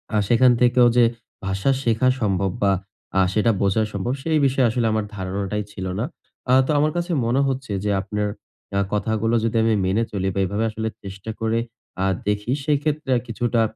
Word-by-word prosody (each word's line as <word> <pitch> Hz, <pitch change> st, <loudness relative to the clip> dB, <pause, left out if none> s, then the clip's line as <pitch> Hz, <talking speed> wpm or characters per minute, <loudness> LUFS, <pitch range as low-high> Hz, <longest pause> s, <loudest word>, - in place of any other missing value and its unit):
আ -, -, +4 dB
সেখান 125 Hz, +3 st, +5 dB
থেকেও 125 Hz, 0 st, +5 dB
যে 120 Hz, -, +7 dB, 0.4 s
ভাষা 95 Hz, +7 st, +1 dB
শেখা 115 Hz, +1 st, +2 dB
সম্ভব, 95 Hz, -2 st, +1 dB
বা 100 Hz, -, +4 dB, 0.5 s
আ -, -, +5 dB
সেটা 110 Hz, +3 st, +3 dB
বোঝা 100 Hz, +3 st, +2 dB
সম্ভব, 100 Hz, +6 st, -2 dB
সেই 160 Hz, -1 st, +2 dB
বিষয়ে 130 Hz, -2 st, +3 dB
আসলে 115 Hz, +1 st, 0 dB
আমার 110 Hz, -1 st, 0 dB
ধারণাটাই 100 Hz, +2 st, -3 dB
ছিল 95 Hz, -2 st, -6 dB
না। 120 Hz, -, 0 dB, 0.5 s
আ -, -, +6 dB
তো -, -, +1 dB
আমার 155 Hz, +1 st, +2 dB
কাছে 175 Hz, +1 st, -2 dB
মনে 125 Hz, +4 st, +2 dB
হচ্ছে 130 Hz, -3 st, -3 dB
যে, 105 Hz, -, +1 dB
আপনার 105 Hz, +1 st, -2 dB, 0.5 s
এ -, -, +3 dB
কথাগুলা 110 Hz, +2 st, 0 dB
যদি 115 Hz, 0 st, 0 dB
আমি 115 Hz, -1 st, +3 dB
মেনে 100 Hz, +5 st, +1 dB
চলি 95 Hz, -2 st, -2 dB
বা 100 Hz, -, -2 dB
এভাবে 100 Hz, +4 st, -1 dB
আসলে 110 Hz, +1 st, -3 dB, 0.2 s
চেষ্টা 100 Hz, +3 st, -7 dB
করে 115 Hz, +1 st, +1 dB, 0.4 s
আ -, -, +2 dB, 0.2 s
দেখি, 105 Hz, +3 st, -1 dB
সেই 150 Hz, -1 st, +3 dB
ক্ষেত্রে 150 Hz, -2 st, -2 dB
আ -, -, 0 dB
কিছুটা 115 Hz, 0 st, 0 dB
110 Hz, 190 wpm, -22 LUFS, 100-125 Hz, 0.5 s, যে